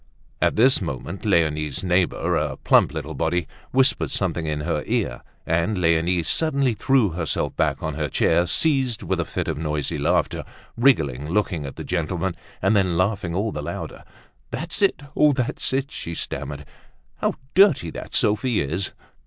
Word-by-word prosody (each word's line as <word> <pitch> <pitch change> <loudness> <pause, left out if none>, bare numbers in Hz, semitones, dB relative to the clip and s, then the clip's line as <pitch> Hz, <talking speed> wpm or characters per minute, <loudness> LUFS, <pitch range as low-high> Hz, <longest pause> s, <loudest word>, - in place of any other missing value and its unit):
At - - +2
this 130 +3 +5
moment 85 - -5
Leonie's 75 -7 +1
neighbor, 90 -1 +1
a - - -1
plump - - +4
little 80 0 -5
body, 80 +4 0 0.3
whispered 130 0 +3
something 80 -2 -1
in 75 -1 -2
her 75 -1 -1
ear - - -1 0.2
and 85 +5 0
Leonie 85 0 +2
suddenly 140 - +2
threw 115 +1 +2
herself 85 -2 -2
back 75 -3 0
on 80 -1 -2
her 75 0 -2
chair, 85 +6 +2
seized 135 - +1
with - - -1
a - - 0
fit - - -3
of 80 -2 -2
noisy 75 -3 -2
laughter, - - +1 0.3
wriggling, 75 - +2
looking 85 -6 0
at 70 - -8
the - - -6
gentleman 90 +1 -2 0.3
and 100 +3 +3
then 95 -4 +2
laughing 95 -2 0
all 105 +4 0
the 75 - -4
louder. 75 - -6 0.5
"That's 165 +4 -3
it. 195 -7 +2
Oh! 150 -1 +5
that's 130 -3 -1
it," 135 +2 -1
she 85 - -5
stammered. 75 -2 -5 0.5
"How - - 0 0.2
dirty 185 - +5
that - - -7
Sophie 110 +3 +2
is!" 80 +7 -2
90 Hz, 165 wpm, -23 LUFS, 80-110 Hz, 0.5 s, this